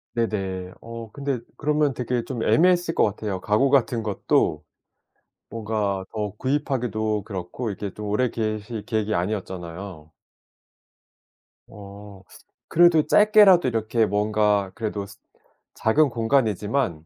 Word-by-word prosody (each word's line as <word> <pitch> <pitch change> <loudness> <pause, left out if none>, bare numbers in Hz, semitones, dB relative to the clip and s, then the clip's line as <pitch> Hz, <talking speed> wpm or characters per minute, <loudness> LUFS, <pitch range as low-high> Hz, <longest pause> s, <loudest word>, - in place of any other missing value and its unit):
네네. 95 -5 -2
어 115 -1 -9
근데 140 -3 -3 0.2
그러면 150 -1 +1
되게 125 0 -2
좀 120 -2 -5
애매했을 175 +4 +3
것 - - +3
같아요. 100 -2 -2
가구 110 +8 +2
같은 125 -4 +2
것도 95 -7 0 0.9
뭔가 105 -4 -2
더 105 -2 -3
구입하기도 125 -6 -1
그렇고 100 +3 -5
이게 100 -1 -6
좀 105 - -7
오래 125 +5 +1
계실 110 -1 -4
계획이 110 0 -1
아니었잖아요. 90 -3 -5 1.6
어 100 -1 -12 0.5
그래도 165 -2 +5
짧게라도 210 - +6
이렇게 115 -1 +1
뭔가 105 -1 +1
그래도 105 -3 -3 0.7
작은 140 +7 +3
공간이지만 115 - 0
110 Hz, 265 characters per minute, -24 LUFS, 100-130 Hz, 1.6 s, 짧게라도